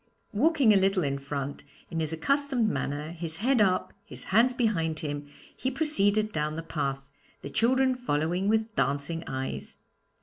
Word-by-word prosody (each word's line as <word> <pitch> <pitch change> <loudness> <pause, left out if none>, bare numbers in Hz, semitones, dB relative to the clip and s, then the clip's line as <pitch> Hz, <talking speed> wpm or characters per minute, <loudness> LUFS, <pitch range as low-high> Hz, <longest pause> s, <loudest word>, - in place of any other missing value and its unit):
Walking 270 -1 +4
a - - +5
little 195 -1 +2
in 140 -1 -1
front, 140 0 -5 0.3
in 165 - -2
his 160 -1 -1
accustomed 265 - +1
manner, 150 -5 -2
his 165 -1 -4
head 240 +5 +2
up, 185 -3 +2
his - - -7
hands 235 +4 +6
behind 185 -11 0
him, 145 -1 -4 0.3
he 260 - -1
proceeded 215 -8 +2
down 150 -2 -1
the 165 - -4
path, 140 -4 -3 0.3
the 140 - -6
children 260 - +3
following 180 -5 -1
with 220 +1 +1
dancing 145 +4 -1
eyes. 130 0 -4
175 Hz, 160 wpm, -28 LUFS, 145-230 Hz, 0.3 s, hands